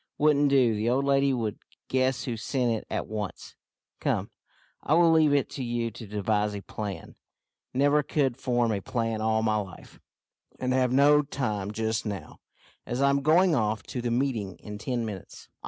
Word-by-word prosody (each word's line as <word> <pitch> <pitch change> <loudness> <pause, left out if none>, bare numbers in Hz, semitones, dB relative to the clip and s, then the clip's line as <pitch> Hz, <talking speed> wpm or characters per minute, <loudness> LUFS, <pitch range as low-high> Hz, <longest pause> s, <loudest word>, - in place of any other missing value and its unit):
"Wouldn't 145 -1 +4
do. 130 -5 +4
The 110 +2 0
old 135 +3 +1
lady 140 0 +3
would 115 -6 -2 0.3
guess 130 -1 +1
who 120 - -3
sent 120 +2 -1
it 110 - -3
at - - -2
once. 105 -2 -6 0.5
Come, - - -1 0.5
I 155 - +2
will 170 -1 +5
leave 160 -2 +5
it 140 -2 +2
to 135 - -5
you 120 -1 -2
to 110 +1 -10
devise 105 0 0
a 100 - -5
plan. 100 -1 -6 0.6
Never 145 +3 +3
could 140 -3 0
form 120 -2 0
a 100 -2 -1
plan 115 0 -2
all 110 0 +1
my 110 -1 +2
life, 95 -4 -8 0.6
and 130 0 0
have 130 -1 +2
no 145 +3 +5
time 110 -9 -3
just 110 +1 -2
now, 100 -7 -6 0.4
as 120 - -4
I'm 140 0 +3
going 165 +5 +4
off 110 -5 0
to 125 - -5
the 120 - -1
meeting 120 -6 -1
in 105 -1 -9
ten 120 +1 -2
minutes. 100 -4 -9
120 Hz, 180 wpm, -27 LUFS, 110-140 Hz, 0.6 s, will